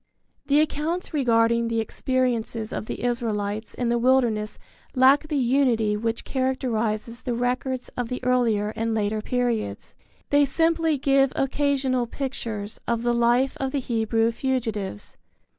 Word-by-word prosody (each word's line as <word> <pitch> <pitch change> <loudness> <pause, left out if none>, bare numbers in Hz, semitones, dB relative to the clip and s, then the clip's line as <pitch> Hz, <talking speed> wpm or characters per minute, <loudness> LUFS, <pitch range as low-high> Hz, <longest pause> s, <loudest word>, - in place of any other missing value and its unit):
The 285 +2 +4
accounts 320 +4 -2
regarding 235 -4 +2
the 230 0 0
experiences 230 -1 -1
of 220 - -4
the - - -5
Israelites 220 -3 -2
in 245 -1 -1
the 240 0 +2
wilderness 235 -4 +2 0.4
lack 270 +4 +5
the 300 -2 -1
unity 240 -5 +2
which 225 +2 -2
characterizes 235 -4 -1
the 245 - -2
records 250 +1 -2
of 245 -2 -4
the 250 - -3
earlier 235 -5 +2
and 225 0 -1
later 215 0 0
periods. 245 -2 -2 0.4
They 285 0 +5
simply 325 +2 +1
give 275 -1 +3
occasional 270 -3 0
pictures 225 -6 -5
of 235 0 0
the 240 0 +2
life 240 +3 +2
of 265 -1 -2
the 285 - +1
Hebrew 225 -2 +1
fugitives. 225 - -3
245 Hz, 140 wpm, -24 LUFS, 225-265 Hz, 0.4 s, lack